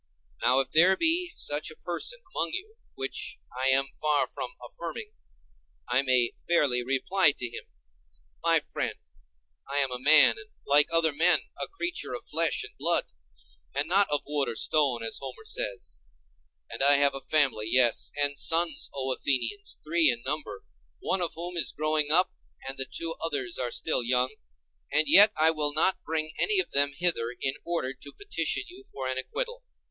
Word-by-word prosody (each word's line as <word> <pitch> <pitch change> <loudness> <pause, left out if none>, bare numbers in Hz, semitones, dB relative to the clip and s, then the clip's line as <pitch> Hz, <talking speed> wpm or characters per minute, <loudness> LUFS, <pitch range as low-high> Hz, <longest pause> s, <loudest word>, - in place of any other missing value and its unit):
Now 125 +3 +4
if 135 - -7
there 180 +4 +5
be 340 +2 +2
such 145 +1 -1
a 155 - -8
person 470 - -3
among - - -2
you, 420 +4 -6 0.2
which - - -4 0.2
I 130 +1 0
am 135 +1 +3 0.2
far 150 -1 +2
from - - -7
affirming, 445 -3 -7 0.8
I 125 +2 +2
may 130 -3 +2
fairly 140 -8 +2
reply 140 +6 +2
to 125 - -5
him: 120 - -9 0.8
My - - +3
friend, - - -4 0.7
I 140 - -2
am 135 -2 +2
a 125 - -4
man, 150 - +6
and 420 0 -13 0.2
like 145 +2 +4
other 165 -2 +2
men, 170 +5 +3
a - - -4
creature 345 -7 -4
of 240 - -8
flesh 165 +1 0
and - - -11
blood, - - 0 0.6
and 140 +2 0
not 195 +4 +2
of 145 - -1
wood 145 -1 -1
or - - -3
stone, 135 -4 +1
as 115 - -2
Homer 135 -2 -8
says; 65 - -4 0.7
and - - -7
I 140 +1 +5
have 140 0 +3
a 135 - -4
family, 135 -6 +1
yes, 120 -1 +3
and 145 -1 0
sons. 165 -1 +2
O 135 -1 -1
Athenians, 135 - -2
three 160 0 +3
in 120 -1 -2
number, 130 -8 -4 0.3
one 190 - -2
of 170 -2 -1
whom 175 +2 -5
is 165 - 0
growing 155 -1 0
up, 180 +3 +3 0.3
and 135 - -4
the 135 - -1
two 165 0 -2
others 140 -7 -2
are 125 -1 -1
still 155 +3 0
young; 125 +1 0 0.6
and 155 +2 +3
yet 205 +2 +8
I 160 +1 +5
will 150 -2 0
not 185 +4 +1
bring 155 0 -2
any 420 -1 +2
of 375 - -1
them 140 0 +3
hither 160 -10 +2
in 135 - -1
order 165 -7 -2
to 140 +1 -12
petition 415 +1 -1
you 375 +2 -13
for 130 -1 -5
an 130 0 -1
acquittal. - - -5
150 Hz, 180 wpm, -27 LUFS, 135-175 Hz, 0.8 s, yet